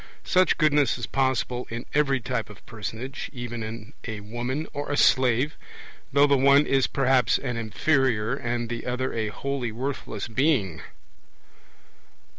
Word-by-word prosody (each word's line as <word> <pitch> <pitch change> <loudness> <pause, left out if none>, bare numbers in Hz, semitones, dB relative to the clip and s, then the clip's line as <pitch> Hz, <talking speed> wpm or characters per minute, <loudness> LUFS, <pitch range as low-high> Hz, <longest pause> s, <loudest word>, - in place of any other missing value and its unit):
Such 185 -1 +3
goodness 150 -4 +3
is 120 - -3
possible 130 -2 -1
in 115 +1 -5
every 140 -2 +2
type 120 -2 -3
of 105 - -14
personage, 115 +4 -6
even 120 -2 -5
in 110 +2 -7
a 110 -2 -5
woman 120 +8 -3
or 145 0 -4
a 145 - 0
slave, 130 +2 +3 0.6
though 140 +1 +5
the 140 -1 +4
one 140 +2 +6
is 135 -1 +2
perhaps 130 -3 +3
an 125 -3 -4
inferior, 115 0 +1
and 120 -2 -2
the 120 +1 -5
other 125 +1 -2
a 110 -1 -1
wholly 130 +2 -3
worthless 120 -3 -4
being. 120 - +1
125 Hz, 145 wpm, -25 LUFS, 115-140 Hz, 0.6 s, one